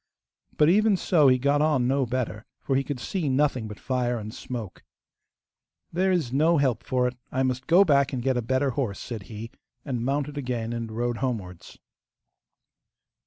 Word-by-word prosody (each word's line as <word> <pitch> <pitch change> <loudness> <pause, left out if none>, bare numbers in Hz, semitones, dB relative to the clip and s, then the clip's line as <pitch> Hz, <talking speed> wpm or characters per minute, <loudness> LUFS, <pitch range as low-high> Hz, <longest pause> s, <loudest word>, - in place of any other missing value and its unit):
But 150 - +5
even 205 +3 +4
so 160 -5 +3
he 130 -1 +5
got 140 +3 +2
on 150 -5 +2
no 135 0 +1
better, 120 -3 -3
for 135 - -1
he 135 - +2
could 140 -2 -4
see 160 +4 -2
nothing 130 -4 +1
but 105 -1 -9
fire 125 -2 -1
and 110 0 -7
smoke. 120 -7 -7 1.1
'There 190 +3 +2
is 160 -9 0
no 160 +4 +3
help 130 -5 +1
for 125 0 +1
it; 125 - -4 0.2
I 130 - 0
must 130 0 -2
go 180 +4 +6
back 140 -4 +3
and 125 -3 -3
get 130 0 +1
a 125 - 0
better 130 +4 0
horse,' 120 -7 -2
said 115 -4 -6
he, 115 +1 -7 0.3
and 125 -5 -2
mounted 145 +2 -1
again 120 -3 -3
and 115 -1 -4
rode 120 +1 -2
homewards. 105 -10 -4
130 Hz, 180 wpm, -26 LUFS, 120-145 Hz, 1.1 s, go